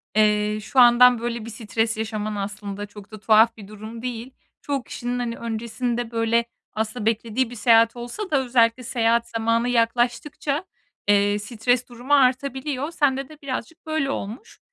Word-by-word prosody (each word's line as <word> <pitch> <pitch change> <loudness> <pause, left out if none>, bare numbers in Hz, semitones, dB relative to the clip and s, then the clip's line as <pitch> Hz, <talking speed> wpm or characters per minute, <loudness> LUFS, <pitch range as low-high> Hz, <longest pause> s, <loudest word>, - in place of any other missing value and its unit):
eee, 210 0 +2
şu 255 +5 0
andan 245 0 +7
böyle 235 -1 -4
bir - - -7
stres 225 0 -2
yaşaman 215 -1 -3
aslında 205 0 -5
çok 205 0 -14
da 215 - -9
tuhaf 220 +2 +4
bir 200 -2 -11
durum 215 +2 -9
değil. 245 0 -5 0.3
Çoğu 280 -3 -2
kişinin, 245 +1 -4
hani, 235 -1 -2
öncesinde, 235 +1 -3
böyle, 230 0 +1 0.3
aslında 220 +1 -3
beklediği 230 +2 0
bir 245 - -9
seyahat 230 +1 +4
olsa 240 - -6
da 285 - +4
özellikle 240 0 +2
seyahat 235 -1 +1
zamanı 230 +1 0
yaklaştıkça, 245 +7 0 0.4
eee, 205 0 +3
stres 240 +4 -1
durumu 245 +4 -3
artabiliyor. 270 +2 +1
Sende 275 -4 0
de 305 -1 -15
birazcık 280 +5 -6
böyle 310 -3 -1
olmuş. 235 - -7
235 Hz, 155 wpm, -23 LUFS, 220-250 Hz, 0.4 s, andan